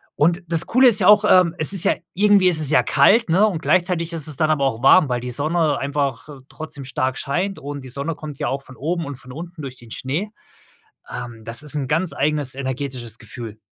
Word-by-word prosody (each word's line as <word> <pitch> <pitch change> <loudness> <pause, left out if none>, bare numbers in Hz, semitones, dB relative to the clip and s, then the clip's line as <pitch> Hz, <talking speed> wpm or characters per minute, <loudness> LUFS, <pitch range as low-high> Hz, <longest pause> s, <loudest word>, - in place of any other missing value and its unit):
und 170 +4 +1
das 165 -1 -1
Coole 255 +2 +5
ist 210 - +4
ja - - +2
auch, 210 0 +6
ähm, 180 -2 +4
es 155 +5 +3
ist 190 0 +5
ja - - +3 0.2
irgendwie 200 -1 +4
ist 160 -3 +1
es 145 - +2
ja 125 -5 +4
kalt, 185 - +3
ne, 195 +6 +4
und 170 -6 -3
gleichzeitig 170 +1 0
ist 160 -2 0
es 150 - -2
dann 155 -1 +1
aber 140 -3 +1
auch 120 -1 -2
warm, 145 +1 +6
weil 120 -1 -1
die 125 0 -5
Sonne 155 +2 0
einfach 140 -1 -3 0.2
trotzdem 150 -3 -9
stark 130 0 -2
scheint 180 +8 -2
und 145 0 -7
die 130 - -11
Sonne 140 +6 -4
kommt 150 -3 -9
ja - - -2
auch 135 +1 -3
von 130 - -14
oben 165 +4 -2
und 140 -1 -6
von 125 0 -13
unten 170 +3 -9
durch 130 -1 -7
den 120 -1 -15
Schnee. 155 +11 -3 0.8
Ähm, 115 -2 -8
das 115 +5 -3
ist 150 0 -2
'n 135 -2 -2
ganz 160 0 0
eigenes 145 -2 -1
energetisches 130 -4 -5
Gefühl. 110 -1 -9
150 Hz, 230 wpm, -21 LUFS, 130-170 Hz, 0.8 s, auch